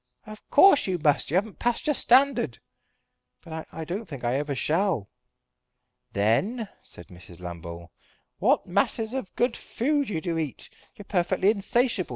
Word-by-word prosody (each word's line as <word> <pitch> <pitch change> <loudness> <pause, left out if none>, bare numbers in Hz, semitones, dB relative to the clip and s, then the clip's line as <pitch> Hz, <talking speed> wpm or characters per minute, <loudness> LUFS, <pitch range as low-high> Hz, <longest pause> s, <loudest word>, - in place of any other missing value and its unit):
"Of 215 -1 -10
course 290 - +6
you 185 -1 0
must. 150 -3 +2
You 160 - -1
haven't 200 +2 -1
passed 240 -1 0
your 300 - +2
standard." 255 - +3 0.8
"But 160 -1 -8
I 160 - -6
don't 190 +7 -5
think 140 -6 -8
that 120 - +1
I - - +1
ever 145 -1 -3
shall." 160 - 0 1.0
"Then," 190 - +1
said 85 - -11
Mrs. 90 -1 -13
Lambole, 85 -1 -8 0.5
"what - - +3
masses 225 +1 0
of 260 -8 -5
good 240 -1 +1
food 285 +2 -1
you 175 -6 -2
do 165 -1 -2
eat. 150 -5 -5 0.2
You're 205 - -11
perfectly 185 +1 +2
insatiable. 220 -1 0
185 Hz, 160 wpm, -26 LUFS, 140-230 Hz, 1.0 s, course